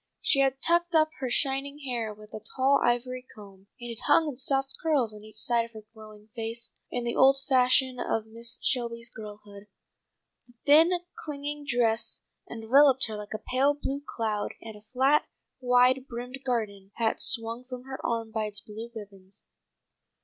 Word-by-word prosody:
She 275 - +2
had 270 -1 +2
tucked 345 0 +3
up 310 0 +4
her 260 -2 -2
shining 275 +3 0
hair 235 -4 -2
with 215 0 -14
a - - -5 0.2
tall 275 +1 +3
ivory 250 +1 0
comb, 200 -2 -14
and 240 -1 -6
it 230 - -8
hung 325 - +5
in 285 - -6
soft 270 +1 0
curls 280 -9 +1
on 210 0 -12
each 215 -1 -13
side 235 +1 +2
of 230 0 -11
her 220 -1 -10
glowing 215 -1 -14
face, 230 0 -2 0.2
in 245 - -3
the 235 0 -2
old 270 +1 +6
fashion 255 -1 +3
of 225 -2 -1
Mrs. 230 +2 -7
Shelby's 235 -2 -1
girlhood. 210 -1 -11 0.8
The 245 - -21
thin, 310 +4 +7 0.3
clinging 290 -1 -5
dress 230 -2 0 0.3
enveloped 260 +4 +5
her 215 - -4
like 210 0 -6
a 215 - -9
pale 275 +3 +3
blue 280 0 -3
cloud, 215 -6 -3
and 220 -1 -9
a 210 - -13
flat, 260 +7 +2 0.3
wide 250 +1 +3
brimmed 250 +2 -7
garden 210 -6 -2
hat 225 -1 0
swung 230 0 +2
from 250 -1 -8
her 265 0 -8
arm 230 -1 -2
by 220 -1 -1
its 210 -1 -5
blue 220 +2 -9
ribbons. 200 -2 -9
240 Hz, 175 wpm, -28 LUFS, 220-270 Hz, 0.8 s, thin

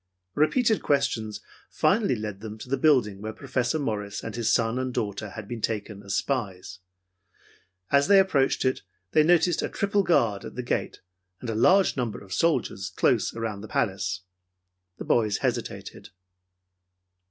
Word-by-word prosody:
Repeated 220 - +2
questions 110 -7 0 0.3
finally 200 - +2
led 105 -3 -5
them 110 -1 -7
to 110 - -10
the 135 - +1
building 125 -9 +2
where 110 +1 -4
Professor 130 +3 -1
Morris 105 -7 -3
and 115 - -6
his 120 -2 0
son 115 +1 +1
and 130 0 -2
daughter 105 0 -3
had 105 +1 -8
been 120 0 -6
taken 105 -2 -3
as 100 -1 -3
spies. 95 -8 -3 1.1
As 140 +2 +4
they 200 0 +7
approached 145 -9 +2
it, 130 - +1 0.3
they 155 - +5
noticed 175 +2 +3
a - - -2
triple 200 0 +1
guard 115 - +2
at - - -9
the 125 - -4
gate 120 - -2 0.4
and 120 - -4
a - - -2
large 185 - +4
number 120 -4 -2
of 95 -2 -9
soldiers 115 - 0
close 90 - +1
around 110 -3 -4
the 110 - -8
palace. 95 -3 -1 0.8
The - - -7
boys 105 -3 +2
hesitated. 125 -3 -4
115 Hz, 160 wpm, -26 LUFS, 105-140 Hz, 1.1 s, they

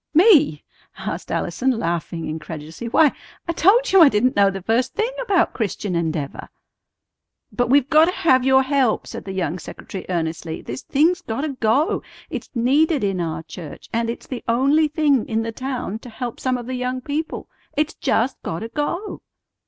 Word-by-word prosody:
"Me?" 310 - +5 0.3
asked - - -5
Allison, 265 - -1
laughing 170 - -2
incredulously. 160 +6 -6
"Why, 300 +4 +5 0.4
I - - +1
told 410 +9 +4
you 385 -1 +7
I 310 - +9
didn't 250 +2 +2
know 200 -1 +5
the 195 -1 -6
first 240 +5 0
thing 445 +3 0
about 400 -8 +2
Christian 205 -4 -2
Endeavor." 160 -4 -3 1.0
"But 240 +3 0
we've 275 0 +4
gotta 315 +3 +5
have 260 -8 +3
your 265 0 +5
help," 265 -4 +1
said - - -8
the 195 - -5
young 185 -2 -2
secretary 190 - -8
earnestly. 165 -2 -3
"This 125 +2 -6
thing's 320 +5 +2
gotta 275 +7 -3
go! 265 +3 +1 0.3
It's - - -5
needed 280 +4 +2
in 195 -3 0
our 160 -1 -3
church, 160 -2 -10
and 230 0 0
it's 235 - -5
the 255 - -6
only 275 +7 +3
thing 295 -5 +1
in 225 0 0
the 225 - -3
town 250 -3 -4
to 245 - -11
help 240 +1 -6
some 255 -1 0
of 240 - -7
the 255 - -5
young 255 0 -2
people. 295 +4 -4 0.3
It's 300 +1 +1
just 240 +4 0
gotta 210 +8 -4
go!" 345 - -3
250 Hz, 175 wpm, -22 LUFS, 195-295 Hz, 1.0 s, I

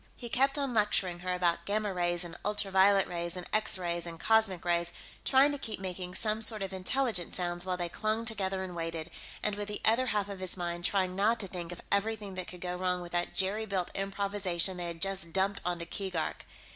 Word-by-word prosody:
He 240 - -7
kept 275 +4 +3
on 275 -3 -1
lecturing 200 -5 +2
her 180 +1 -3
about 175 -2 +1
gamma 210 0 0
rays 175 -1 +1
and 170 -1 -8
ultra 205 -1 0
violet 195 +1 +5
rays 170 0 -3
and 180 - -5
X 215 -2 +4
rays 175 -1 -2
and 165 -1 -7
cosmic 220 -5 +3
rays, 170 0 +1 0.3
trying 270 +2 +5
to 285 - -3
keep 220 -6 -3
making 180 -1 -5
some 215 0 +2
sort 215 -2 +2
of 195 0 -5
intelligent 190 0 0
sounds 175 0 -1
while 180 -1 0
they 175 -1 -1
clung 215 +5 -1
together 195 -4 0
and 180 -2 -6
waited, 165 0 -4 0.3
and, 210 - +2
with 205 0 -4
the 210 -1 -2
other 240 +4 +4
half 210 -4 0
of 200 -2 -7
his 185 0 0
mind, 175 -1 -3
trying 185 -2 +1
not 215 +4 +2
to 195 - -2
think 175 -2 -5
of 175 - -8
everything 205 0 0
that 185 -1 -4
could 180 -1 -9
go 180 0 -2
wrong 180 0 -1
with 175 - -9
that 175 0 -1
jerry 205 +3 +2
built 185 -3 -1
improvisation 195 -2 0
they 175 -1 -3
had 170 -1 -2
just 195 -3 -2
dumped 195 +1 +1
onto 175 -1 -2
Keegark. 185 -3 -3
190 Hz, 220 wpm, -31 LUFS, 175-210 Hz, 0.3 s, violet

